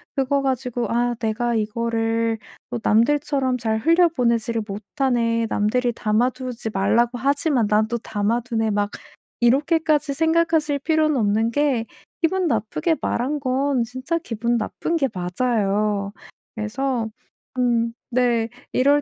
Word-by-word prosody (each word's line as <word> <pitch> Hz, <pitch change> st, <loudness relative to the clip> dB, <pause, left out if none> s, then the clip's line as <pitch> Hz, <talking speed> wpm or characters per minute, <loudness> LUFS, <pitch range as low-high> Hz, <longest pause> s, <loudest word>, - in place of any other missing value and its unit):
그거 275 Hz, 0 st, +1 dB
가지고 250 Hz, -3 st, -1 dB
'아 240 Hz, +1 st, +1 dB
내가 235 Hz, +1 st, -1 dB
이거를 225 Hz, +1 st, 0 dB, 0.3 s
또 240 Hz, -, -2 dB
남들처럼 265 Hz, +3 st, +2 dB
잘 220 Hz, -1 st, 0 dB
흘려 335 Hz, +8 st, +4 dB
보내지를 235 Hz, -6 st, 0 dB
못하네. 230 Hz, +2 st, 0 dB
남들이 235 Hz, +4 st, +1 dB
담아두지 240 Hz, +2 st, -1 dB
말라고 235 Hz, +5 st, +2 dB
하지만 275 Hz, -3 st, +1 dB
난 215 Hz, +1 st, +2 dB
또 235 Hz, 0 st, -2 dB
담아두네.' 225 Hz, +1 st, -1 dB
막 205 Hz, 0 st, 0 dB, 0.5 s
이렇게까지 295 Hz, +3 st, +2 dB
생각하실 320 Hz, -2 st, +2 dB
필요는 310 Hz, 0 st, +2 dB
없는 220 Hz, +1 st, +1 dB
게 270 Hz, -4 st, +1 dB, 0.3 s
기분 360 Hz, +2 st, +1 dB
나쁘게 230 Hz, +7 st, 0 dB
말한 275 Hz, +5 st, -1 dB
건 265 Hz, -1 st, +1 dB
진짜 255 Hz, +8 st, -3 dB
기분 235 Hz, -5 st, -1 dB
나쁜 235 Hz, +9 st, -2 dB
게 275 Hz, -4 st, +2 dB
맞아요. 200 Hz, +1 st, 0 dB, 0.4 s
그래서 235 Hz, +2 st, -2 dB, 0.5 s
음 235 Hz, -2 st, +1 dB, 0.2 s
네 235 Hz, -2 st, +2 dB, 0.2 s
이럴 285 Hz, +3 st, +4 dB
240 Hz, 270 characters per minute, -22 LUFS, 225-275 Hz, 0.5 s, 흘려